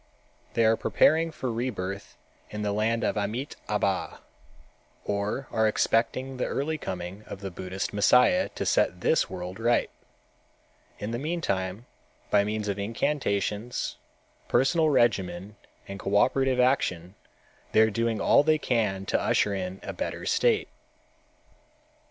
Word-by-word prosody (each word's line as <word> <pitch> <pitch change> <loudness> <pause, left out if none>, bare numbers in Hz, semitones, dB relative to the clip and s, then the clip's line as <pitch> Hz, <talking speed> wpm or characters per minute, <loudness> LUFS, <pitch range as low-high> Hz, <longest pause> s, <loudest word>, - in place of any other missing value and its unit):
They 115 - +3
are 110 +1 +5
preparing 160 +7 +3
for 130 -5 -4
rebirth 100 -5 -4 0.3
in 105 0 -5
the 105 - 0
land 110 +2 0
of - - 0
Amitâbha, 105 -3 -2 0.9
or 105 +6 -2
are 110 -1 +2
expecting 125 +4 0
the 125 - -1
early 155 +3 -2
coming 90 0 -5
of 100 - -8
the 95 -1 -5
Buddhist 95 +3 -4
Messiah 125 +4 +4
to - - -3
set 90 0 +1
this 160 - +2
world 90 +1 -6
right. 120 +1 +2 1.1
In 105 +2 -5
the 120 - -2
meantime, 115 - -2 0.5
by 100 -1 +5
means 105 0 -3
of 100 0 -2
incantations, 110 -1 -2 0.5
personal 155 +4 +3
regimen 100 -7 +1 0.3
and 100 0 -7
cooperative 125 +7 +2
action 95 -9 +1 0.6
they 110 - +5
are 110 0 +4
doing 115 0 0
all - - +5
they 155 +1 +3
can 105 -9 0
to - - 0
usher 105 - +2
in 95 0 -4
a - - -5
better - - -4
state. 460 -3 +2
110 Hz, 135 wpm, -27 LUFS, 100-125 Hz, 1.1 s, are